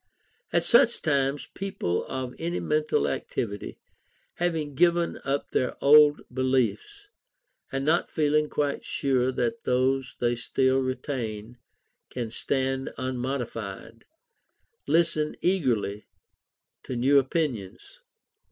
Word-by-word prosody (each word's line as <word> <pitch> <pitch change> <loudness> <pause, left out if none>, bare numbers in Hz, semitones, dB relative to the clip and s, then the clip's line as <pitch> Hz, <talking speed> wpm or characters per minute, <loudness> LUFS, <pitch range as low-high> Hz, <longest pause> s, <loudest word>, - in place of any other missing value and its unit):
At - - +2
such 235 0 +4
times 140 -2 0
people 190 - -2
of 130 -1 -4
any 170 +2 -2
mental 150 - +1
activity, 100 -3 -4 0.6
having 165 -4 -1
given 170 +3 +2
up 140 +1 -2
their 130 - 0
old 150 +1 +6
beliefs, 130 - -1 0.6
and 135 0 -2
not 165 +3 +2
feeling 150 -1 +1
quite 145 -1 -1
sure 130 -2 0
that 230 - -2
those 130 +1 +1
they 120 0 +1
still 130 +2 +1
retain 125 -4 -4 0.5
can 120 -3 -4
stand 135 +2 -1
unmodified, 120 -4 -4 0.8
listen 160 -2 +2
eagerly 120 - 0 0.7
to 130 - -6
new 135 +4 +4
opinions. 135 - -3
135 Hz, 105 wpm, -26 LUFS, 125-150 Hz, 0.8 s, old